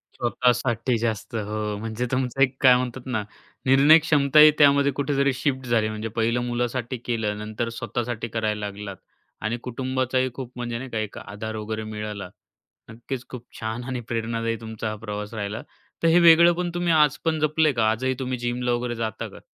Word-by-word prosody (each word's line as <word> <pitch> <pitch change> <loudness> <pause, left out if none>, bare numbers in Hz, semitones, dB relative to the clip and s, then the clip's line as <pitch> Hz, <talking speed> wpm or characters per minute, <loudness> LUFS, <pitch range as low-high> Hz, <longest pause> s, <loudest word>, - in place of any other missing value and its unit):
स्वतःसाठी 120 0 +1
जास्त, 110 -1 -3
हो. 105 -1 -3
म्हणजे 110 +3 -3
तुमचं 130 0 -1
एक 130 -1 +4
काय 130 -2 +8
म्हणतात 125 0 -3
ना 120 -5 -2 0.4
निर्णय 140 +5 +7
क्षमताही 150 0 +6
त्यामध्ये 140 -1 +5
कुठेतरी 140 0 +1
शिफ्ट 130 0 -2
झाली, 110 -2 +2
म्हणजे 110 +1 -4
पहिलं 115 +2 +1
मुलासाठी 120 +1 -2
केलं, 110 -3 -1
नंतर 110 +2 -4
स्वतःसाठी 120 -1 -3
करायला 110 -2 -2
लागलात 100 -2 -7 0.5
आणि 110 +2 -1
कुटुंबाचाही 130 +1 -1
खूप 125 -1 -7
म्हणजे 120 -1 -4
नाही 130 +2 -7
का, 115 - -4
एक 110 -2 -5
आधार 110 +2 -6
वगैरे 110 0 -4
मिळाला. 105 -2 -6 0.6
नक्कीच 120 +3 -6
खूप 125 -2 -9
छान 110 +2 -4
आणि 130 -1 -3
प्रेरणादायी 115 0 -2
तुमचा 110 -1 -5
हा 110 - -4
प्रवास 105 +1 -5
राहिला 105 +1 -4 0.4
तर - - +5
हे 165 +2 +6
वेगळेपण 170 +1 +6
तुम्ही 175 -1 0
आजपण 155 +1 +2
जपलंय 155 0 +2
का, 110 -2 +2
आजही 130 +4 0
तुम्ही 130 -1 -2
जिमला 120 0 -2
वगैरे 120 0 -1
जाता 115 -1 -3
का? - - -13
120 Hz, 170 wpm, -24 LUFS, 110-130 Hz, 0.6 s, काय